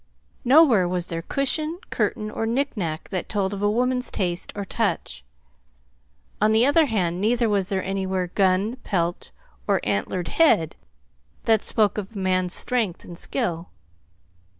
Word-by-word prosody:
Nowhere 250 - +5
was 175 -1 -1
there 165 -2 -4
cushion, 305 - -2
curtain, 215 -2 -1
or 225 - -3
knickknack 225 - -2
that 185 -3 -4
told 200 -2 -1
of 200 - -5
a 205 - +2
woman's 250 +3 0
taste 175 -2 -2
or 200 -1 -4
touch. 65 - -2 1.2
On 215 +1 +4
the 225 +3 +4
other 295 +2 +4
hand, 180 -6 -1
neither 235 +2 +2
was 200 -3 0
there 190 -1 -1
anywhere 190 -2 -2
gun, 195 +5 +1
pelt, 175 -7 -2 0.4
or - - +2
antlered 175 - -2
head 170 - +3 0.7
that 220 -2 +3
spoke 210 -2 +1
of 210 +2 -8
a - - -6
man's 185 -1 +1
strength 225 -8 +1
and 175 - -9
skill. 175 -5 -3
200 Hz, 150 wpm, -23 LUFS, 180-235 Hz, 1.2 s, Nowhere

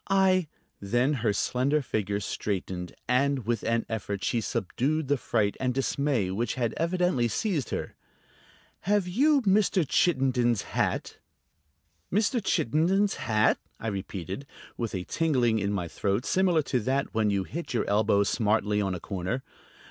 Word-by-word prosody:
"I 190 -3 +3 0.2
..." - - -44
Then 120 +8 +1
her 110 -3 +2
slender 130 +8 +1
figure 100 -4 -1
straightened, 95 -3 -4
and 130 0 +1
with 115 -1 0
an 115 0 0
effort 100 -3 -4
she 115 - +1
subdued 130 - -1
the 145 - +4
fright 105 -4 0
and 125 -1 -1
dismay 135 -7 0
which 115 +5 -1
had 120 -4 -1
evidently 170 -7 +1
seized 155 - -1
her. - - -4 0.9
"Have 200 -1 +1
you 275 +9 +3
Mr. 195 -3 +3
Chittenden's 130 - +2
hat?" - - -2 0.9
"Mr. 215 +4 +1
Chittenden's 185 - +2
hat?" 110 -1 +2 0.2
I 115 - -3
repeated, 95 - -5 0.3
with 115 -4 -3
a 90 - -3
tingling 125 - +1
in 100 0 -1
my 95 -4 -2
throat 100 +7 -1
similar 180 -4 +2
to 130 -2 0
that 130 +5 -1
when 110 -2 +2
you 100 -1 +1
hit 160 - -5
your - - 0
elbow 100 0 +3
smartly 105 -1 +1
on 95 -2 -1
a - - -5
corner. 100 +8 -3
120 Hz, 150 wpm, -27 LUFS, 105-155 Hz, 0.9 s, the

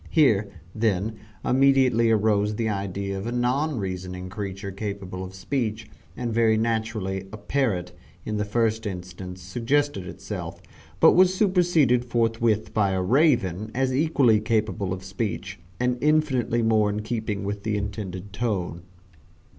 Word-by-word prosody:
Here, 110 -10 +3 0.2
then, 110 0 0 0.3
immediately 130 -3 +4
arose 105 -1 +2
the 115 +1 -1
idea 100 -1 -3
of 100 - -5
a - - -2
non 125 +4 0
reasoning 90 -2 -4
creature 100 0 -5
capable 95 -2 -5
of 95 0 -8
speech, 110 +1 -2 0.3
and 120 -2 -2
very 110 -1 +3
naturally, 110 -4 -1
a 105 - -7
parrot, 105 -6 -1 0.3
in 105 - -2
the 105 - 0
first 110 +1 0
instance, 90 -1 -7
suggested 120 +1 0
itself, - - -6 0.4
but - - +8
was 185 0 +5
superseded 175 - +3
forthwith 115 -2 0
by 100 -3 +2
a 95 - 0
Raven 110 - +2
as 130 0 +1
equally 135 -7 +4
capable 110 -3 -1
of 95 0 -4
speech, 95 +1 -4 0.2
and 125 0 0
infinitely 140 -6 +2
more 110 -2 +3
in 105 +1 -3
keeping 110 -3 -3
with 100 +1 -3
the 105 0 -1
intended 100 -1 -5
tone. 100 -6 -2
110 Hz, 140 wpm, -25 LUFS, 100-120 Hz, 0.4 s, but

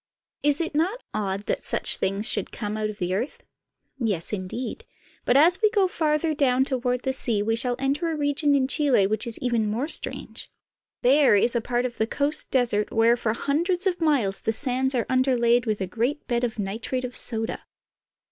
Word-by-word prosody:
Is 290 0 +2
it 330 -2 -3
not 360 +11 -1
odd 200 -2 -2
that - - -2
such - - +1
things 195 +3 -2
should - - -1
come 210 -2 -5
out 215 0 -2
of 210 - -8
the 180 -1 -2
earth? 235 +9 -4 0.6
Yes, 210 -7 -2
indeed; 205 +6 -5 0.4
but 250 - +3
as 340 +7 +5
we 430 - +5
go 405 -3 +2
farther 310 -2 0
down 265 -3 +2
toward 250 -2 -2
the 265 - -1
sea 225 -5 0
we 225 +1 0
shall 245 +1 +5
enter 280 +5 -1
a 320 - -3
region 290 0 +1
in 265 -2 +2
Chile 270 -8 +2
which 215 +4 -1
is 230 - +1
even 235 -4 0
more 235 +7 -2
strange. 315 - -2 0.5
There 270 -2 +5
is 235 +4 +2
a 235 - +1
part 245 +1 -1
of 245 -1 -5
the 220 - +1
coast 290 +5 +2
desert 235 -5 0
where 230 +1 +4
for 220 -2 -1
hundreds 345 - 0
of 360 -2 0
miles 260 -12 +1
the 225 - -1
sands 260 +2 -1
are 235 - 0
underlaid 245 -2 +2
with 215 -1 -1
a - - 0
great 240 +10 -2
bed 240 -1 -1
of 235 -2 -2
nitrate 225 +5 -3
of 245 - -8
soda. 225 -1 -2
250 Hz, 200 wpm, -24 LUFS, 220-285 Hz, 0.6 s, as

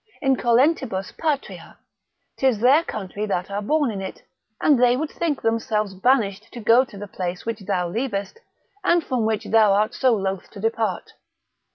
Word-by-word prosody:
Incolentibus 255 - +2
patria, 300 -4 -3 0.6
'tis 260 -4 +2
their 270 +8 +5
country 210 - -5
that 185 -1 -2
are 200 +1 -2
born 290 +3 +1
in 195 -2 -5
it, 190 - -7 0.4
and 285 -5 +3
they 245 0 +4
would 315 +2 -3
think 320 -5 -2
themselves 220 -3 0
banished 210 0 +1
to 240 - -8
go 230 +3 +5
to 225 -6 -12
the 205 - -6
place 180 -2 -5
which 230 -1 -3
thou 190 -3 -1
leavest, 205 - -3 0.4
and 345 -1 +3
from 245 -6 -1
which 220 -2 -1
thou 215 -3 +4
art 210 +2 +1
so 255 -3 +2
loath 195 -2 -3
to 205 - -12
depart. 225 +1 -2
225 Hz, 170 wpm, -23 LUFS, 200-260 Hz, 0.6 s, their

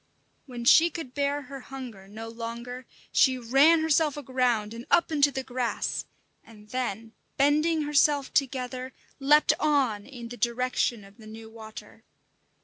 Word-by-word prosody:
When 240 -2 -7
she 330 +7 +7
could 320 -7 -8
bear 285 +1 -1
her 275 +1 -9
hunger 250 -7 -9
no 220 +3 -8
longer, 235 +2 -7 0.2
she 260 -1 +4
ran 275 +7 +4
herself 315 -2 +2
aground 245 -6 0
and 235 +1 -9
up 340 -1 +3
into 290 -2 +4
the 265 -1 -4
grass, 250 -2 -2 0.4
and 210 -2 -17
then, 225 -3 -4 0.3
bending 305 +3 +2
herself 290 -1 +2
together, 255 -1 -2 0.3
leaped 295 +2 +5
on 265 -9 +1
in 240 -4 -9
the 245 - -8
direction 240 -2 -1
of 195 +2 -17
the 220 -2 -14
new 220 +1 -11
water. 220 0 -11
255 Hz, 145 wpm, -27 LUFS, 230-285 Hz, 0.4 s, she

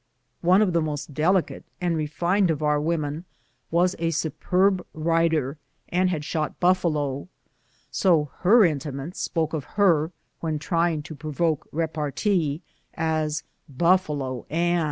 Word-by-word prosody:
One 185 +4 +5
of 185 -4 0
the 170 - +3
most 150 -1 -4
delicate 175 +5 +1 0.2
and 175 -2 0
refined 170 +5 +1
of 155 -1 -1
our 150 -1 +2
women 155 -1 -2 0.5
was 175 +2 +2
a 165 0 +1
superb 180 +4 +1
rider 160 -3 +1 0.3
and 185 +1 +2
had 155 -5 -2
shot 155 -1 -2
buffalo, 155 -6 +1 0.6
so 160 -7 +2
her 215 +4 +6
intimates 150 0 -3
spoke 160 -2 -1
of 155 -3 -2
her, 170 -5 +4 0.3
when 160 -2 -2
trying 165 0 0
to 155 - -8
provoke 155 +1 -1
repartee, 160 +1 -1 0.3
as 155 -1 -1 0.3
"Buf 175 +7 +3
falo 130 -5 -4
Ann." 175 +2 +1
160 Hz, 135 wpm, -25 LUFS, 150-175 Hz, 0.6 s, her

